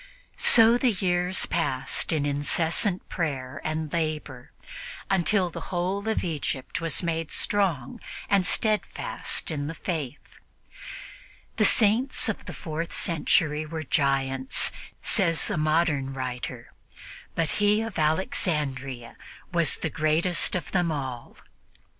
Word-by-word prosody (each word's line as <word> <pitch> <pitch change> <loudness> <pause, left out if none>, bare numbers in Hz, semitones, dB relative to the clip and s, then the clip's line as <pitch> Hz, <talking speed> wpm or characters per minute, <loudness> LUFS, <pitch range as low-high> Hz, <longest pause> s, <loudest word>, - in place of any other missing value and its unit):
So 230 +1 +6
the 245 -3 +2
years 180 -1 +1
passed 135 -6 0
in 155 -3 0
incessant 160 +6 +1
prayer 135 -7 -4
and 155 -1 -3
labor, 155 -6 -3 0.6
until 190 -1 +2
the - - -7
whole 190 +4 -2
of 220 - 0
Egypt 155 -2 -3
was 165 +1 0 0.3
strong 175 -11 0 0.3
and 200 -2 +3
steadfast 215 -3 -1
in 145 -2 -3
the 165 - -5
Faith. 150 -5 -6 1.2
"The - - +4
Saints 235 +5 +4
of 210 - -4
the 180 - -7
fourth 165 +1 -5
century 155 -2 +1
were 160 +1 -6
giants," 135 -2 +1 0.3
says 165 -1 +2
a - - -1
modern 155 -3 +1
writer, 125 -2 -6 0.6
"but 165 -2 0
he 210 +1 +3
of 225 -6 -5
Alexandria 145 -6 -2 0.4
was 170 -2 +4
the 160 - -3
greatest 165 +4 +2
of 175 -5 -4
them 175 -3 +1
all." 130 -5 -6
160 Hz, 115 wpm, -26 LUFS, 145-180 Hz, 1.2 s, So